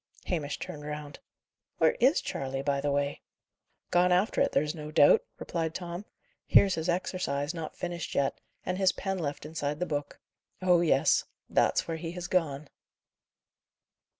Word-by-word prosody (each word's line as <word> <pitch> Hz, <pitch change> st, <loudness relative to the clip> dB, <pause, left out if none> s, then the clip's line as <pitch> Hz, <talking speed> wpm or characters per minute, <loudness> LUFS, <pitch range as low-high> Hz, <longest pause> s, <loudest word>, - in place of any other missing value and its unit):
Hamish 150 Hz, -5 st, -2 dB
turned 150 Hz, -, -7 dB
round. 150 Hz, -1 st, -6 dB, 0.6 s
"Where -, -, +5 dB
is -, -, +4 dB
Charley, 135 Hz, 0 st, -3 dB
by 140 Hz, -1 st, 0 dB
the 145 Hz, -, 0 dB
way?" 140 Hz, 0 st, -1 dB, 0.7 s
"Gone 180 Hz, +1 st, +4 dB
after 185 Hz, +4 st, +2 dB
it, -, -, +3 dB
there's 150 Hz, +1 st, +1 dB
no 150 Hz, -2 st, -7 dB
doubt," 150 Hz, -2 st, +6 dB
replied 165 Hz, -1 st, -3 dB
Tom. 175 Hz, +2 st, -5 dB, 0.4 s
"Here's 195 Hz, -2 st, +6 dB
his 160 Hz, +1 st, -2 dB
exercise, 165 Hz, -5 st, -1 dB
not 165 Hz, -2 st, -6 dB
finished 175 Hz, -1 st, -4 dB
yet, 140 Hz, -1 st, 0 dB, 0.2 s
and 185 Hz, +1 st, -2 dB
his 190 Hz, -1 st, +4 dB
pen 195 Hz, -1 st, -3 dB
left 145 Hz, -3 st, -4 dB
inside 150 Hz, -1 st, -3 dB
the 180 Hz, -, 0 dB
book. 145 Hz, -4 st, -4 dB, 0.4 s
Oh 180 Hz, -2 st, +4 dB
yes; 145 Hz, -5 st, +3 dB, 0.2 s
that's -, -, +2 dB
where 165 Hz, -1 st, -2 dB
he 165 Hz, +1 st, -5 dB
has 180 Hz, -1 st, -5 dB
gone!" 155 Hz, -6 st, 0 dB
160 Hz, 155 wpm, -29 LUFS, 145-180 Hz, 0.7 s, doubt